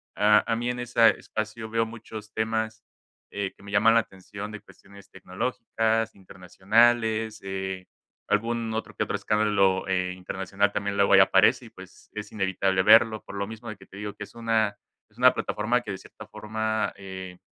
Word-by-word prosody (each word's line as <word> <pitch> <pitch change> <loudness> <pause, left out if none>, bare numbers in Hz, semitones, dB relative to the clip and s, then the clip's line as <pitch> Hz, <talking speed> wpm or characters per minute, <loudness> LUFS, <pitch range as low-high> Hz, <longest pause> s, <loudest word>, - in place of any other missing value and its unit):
a 105 +1 +5
a 115 - +3
mí 120 +1 -2
en 125 0 -3
esa 115 -1 +4
espacio 110 +1 -4
veo 115 0 +1
muchos 110 -2 -10
temas, 110 0 -2 0.5
eh, 100 -1 -4
que - - -20
me 100 - -10
llaman 110 +3 +5
la 115 - +5
atención 100 +1 -9
de 110 - -7
cuestiones 100 0 -17
tecnológicas, 115 +3 -2
internacionales, 110 +4 +1
eh, 95 -1 -4 0.4
algún 115 +1 0
otro 110 - -4
que - - 0
otro - - -3
escándalo, 100 -3 +1
eh, 90 -1 0
internacional 95 +2 -2
también 100 -1 -2
luego 100 0 +4
ahí 100 - +8
aparece 105 +6 +4
y, - - -12
pues, 95 -3 -15
es 105 -1 -6
inevitable 95 -2 +1
verlo, 110 +1 +6
por - - -10
lo 100 0 -2
mismo 110 +2 -9
de 110 - -7
que - - -16
te - - -16
digo 105 0 -5
que - - -8
es - - -20
una 110 -3 0 0.3
es - - -29
una - - +6
plataforma 120 +4 -1
que 105 - -6
de 95 - -4
cierta 110 +3 -13
forma, 110 0 -2
eh, 95 -2 -8
105 Hz, 185 wpm, -26 LUFS, 95-110 Hz, 0.5 s, ahí